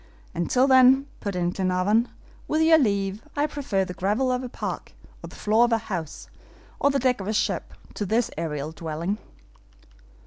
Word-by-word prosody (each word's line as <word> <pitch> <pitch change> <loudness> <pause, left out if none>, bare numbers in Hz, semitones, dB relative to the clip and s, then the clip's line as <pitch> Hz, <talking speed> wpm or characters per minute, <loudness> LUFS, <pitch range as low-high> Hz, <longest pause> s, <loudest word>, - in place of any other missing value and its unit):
"And 170 -1 -2
till 255 +1 +4
then," 260 0 +6
put 200 -2 -4
in 175 -1 0
Glenarvan, 190 +5 +1 0.4
"with 310 +1 +2
your 320 0 +6
leave, 200 -4 0
I 290 0 +2
prefer 275 -10 -1
the 180 - -6
gravel 210 +9 0
of 250 0 0
a 250 - -6
park, - - -5 0.3
or - - -6
the - - -13
floor 215 +3 +3
of 240 - -2
a 230 - +4
house, 185 -8 -6 0.5
or 280 - +3
the 280 - +1
deck 250 -4 +1
of 190 - -6
a 215 - -1
ship, - - -1 0.2
to 205 - -3
this 230 +4 +1
aerial 150 -2 -3
dwelling." 165 +5 -4
210 Hz, 185 wpm, -25 LUFS, 185-255 Hz, 0.5 s, then